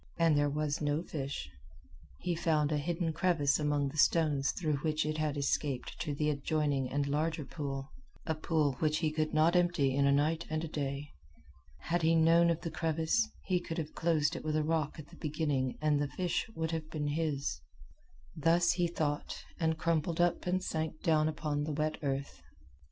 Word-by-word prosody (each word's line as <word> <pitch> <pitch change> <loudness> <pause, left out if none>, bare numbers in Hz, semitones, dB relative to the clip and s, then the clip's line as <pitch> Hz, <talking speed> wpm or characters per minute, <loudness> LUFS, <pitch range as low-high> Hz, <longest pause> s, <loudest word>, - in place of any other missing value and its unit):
And 165 -2 +4
there 145 0 +3
was 150 +1 -1
no 150 +2 0
fish. 135 - -4 0.7
He 180 - 0
found 160 -3 +1
a 150 - +1
hidden 165 +1 -1
crevice 160 -4 +2
among 145 -2 +1
the 155 - -5
stones 145 -4 +3
through 155 -5 -1
which 155 +2 0
it 155 0 -2
had 155 -1 -1
escaped 140 -2 -1
to 150 -3 -2
the 150 +1 +1
adjoining 145 -2 0
and 145 +1 0
larger 150 +1 -1
pool 135 -1 -5 0.3
a 160 - 0
pool 155 -2 +1
which 155 -1 +2
he 155 -1 0
could 155 0 -1
not 160 +3 +3
empty 175 -7 +3
in 140 +1 +3
a - - +4
night 155 +4 +1
and 155 +1 -1
a - - -2
day. 140 -1 -4 0.7
Had 175 +1 0
he 165 +1 +4
known 165 +1 +5
of 170 -1 0
the 165 -2 -4
crevice, 165 +7 +1 0.2
he 185 -2 +2
could 165 -2 -6
have 155 -2 -4
closed 160 -3 +1
it - - -6
with 155 0 -1
a 155 - +2
rock 155 -1 0
at 155 -2 -10
the - - -14
beginning 145 -4 -1
and 150 -1 +3
the 145 - 0
fish 180 +7 -2
would 160 0 -2
have 160 -1 -3
been 150 -2 -2
his. 145 -2 -1 0.7
Thus 170 +2 +3
he 175 -1 +1
thought, 150 -3 -3
and 160 -1 +1
crumpled 165 0 0
up 175 +1 +2
and 185 +1 +1
sank 160 -2 -3
down 155 -2 +3
upon 150 -2 -2
the 150 0 -2
wet 155 +1 -1
earth. 140 -1 -3
155 Hz, 195 wpm, -32 LUFS, 145-165 Hz, 0.7 s, known